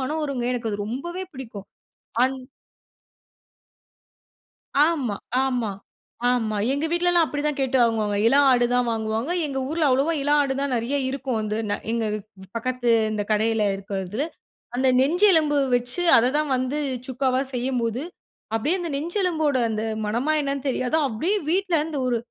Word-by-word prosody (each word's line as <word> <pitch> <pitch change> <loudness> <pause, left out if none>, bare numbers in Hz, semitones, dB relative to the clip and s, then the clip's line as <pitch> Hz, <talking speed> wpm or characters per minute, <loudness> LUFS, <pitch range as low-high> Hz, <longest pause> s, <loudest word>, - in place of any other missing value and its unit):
மணம் 300 +5 -2
வருங்க. 275 -5 -2
எனக்கு 235 -3 -2
அது 205 - -3
ரொம்பவே 345 +11 -4
பிடிக்கும். 225 -7 -8 0.6
அன் 265 +1 +1 2.5
ஆமா, 295 -8 +2 0.3
ஆமா, 245 -5 -1 0.6
ஆமா. 225 -4 0 0.2
எங்க 285 +3 -1
வீட்டிலலாம் 345 0 +3
அப்படி 290 -1 -3
தான் 300 -2 0
கேட்டு 265 0 +1
வாங்குவாங்க. 220 -3 +1
இளம் 280 +4 +5
ஆடு 245 -1 +4
தான் 250 -1 +2
வாங்குவாங்க. 220 +4 -2 0.2
எங்க 275 -2 -3
ஊர்ல 315 0 +1
அவ்ளோவா 275 +6 +2
இளம் 290 +1 +3
ஆடு 270 -1 -1
தான் 280 -1 -1
நிறைய 235 +5 -1
இருக்கும். 260 -2 -3
வந்து 215 0 -2
நா 205 - +2 0.2
எங்க 230 -1 0 0.5
பக்கத்து 250 +1 -1 0.2
இந்த 210 - -1
கடையில் 220 +1 +2
இருக்கிறது. 195 +2 -5 0.6
அந்த 260 +1 +2
நெஞ்செலும்பு 320 0 +4 0.2
வெச்சு, 245 +8 -1
அத 235 +2 +4
தான் 305 -1 -1
வந்து 255 +3 -1 0.3
சுக்காவா 260 0 0
செய்யும்போது 245 -1 -1 0.5
அப்படியே 295 +12 +1
அந்த 345 -2 -4
நெஞ்சு 330 +7 -4
எலும்போட 315 -6 +1
அந்த 215 -1 -2 0.2
மணமா, 235 +8 0
என்னன்னு 280 -1 -3
தெரியாது. 255 +2 0
அப்படியே 320 - 0
வீட்டில 370 -1 +1
இந்த 305 -3 -4
ஒரு 245 -1 +1
260 Hz, 150 wpm, -24 LUFS, 230-300 Hz, 2.5 s, இளம்